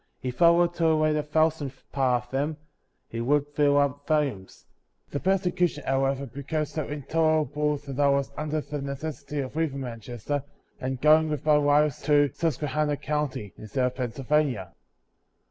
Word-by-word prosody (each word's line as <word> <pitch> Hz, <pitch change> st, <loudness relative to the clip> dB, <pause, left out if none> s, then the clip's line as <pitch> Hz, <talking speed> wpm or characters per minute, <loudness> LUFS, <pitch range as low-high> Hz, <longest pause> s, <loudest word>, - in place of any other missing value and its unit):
If 125 Hz, +2 st, -4 dB
I 170 Hz, -, +9 dB
were 175 Hz, +1 st, +5 dB
to 170 Hz, -1 st, -2 dB
relate 155 Hz, -1 st, +3 dB
a 150 Hz, -, +1 dB
thousandth 150 Hz, -2 st, 0 dB
part 125 Hz, -3 st, +1 dB
of 120 Hz, -, -26 dB
them, 145 Hz, +3 st, -1 dB, 0.5 s
it 115 Hz, -, -3 dB
would 145 Hz, +4 st, +2 dB
fill 145 Hz, -1 st, +3 dB
up 145 Hz, 0 st, 0 dB
vol 155 Hz, -1 st, +4 dB
umes. 100 Hz, -10 st, -7 dB, 0.5 s
The 145 Hz, -, -2 dB
persecution, 180 Hz, -4 st, +1 dB
however, 135 Hz, +1 st, +1 dB
became 140 Hz, +4 st, -3 dB
so 150 Hz, 0 st, -4 dB
intol 155 Hz, +2 st, +1 dB
erable 150 Hz, +1 st, -1 dB
that 140 Hz, -1 st, -6 dB
I 140 Hz, -1 st, +4 dB
was 140 Hz, -1 st, +1 dB
under 155 Hz, 0 st, -2 dB
the 150 Hz, 0 st, -5 dB
necessiiy 140 Hz, 0 st, -4 dB
of 130 Hz, -, -10 dB
leav 160 Hz, -2 st, 0 dB
ing 140 Hz, -, -5 dB
Manchester, 120 Hz, +3 st, -4 dB, 0.4 s
and 130 Hz, 0 st, -3 dB
going 155 Hz, +2 st, +5 dB
with 150 Hz, -1 st, -3 dB
my 150 Hz, -1 st, +5 dB
wife 145 Hz, -1 st, +3 dB
to 145 Hz, -2 st, +4 dB
Sus 165 Hz, -5 st, -1 dB
quehanna 150 Hz, 0 st, -1 dB
county, 150 Hz, -9 st, -3 dB
in -, -, -11 dB
the -, -, -9 dB
state 130 Hz, +5 st, 0 dB
of 125 Hz, -, -1 dB
Pennsylvania. 130 Hz, -, -1 dB
145 Hz, 180 wpm, -26 LUFS, 135-155 Hz, 0.5 s, I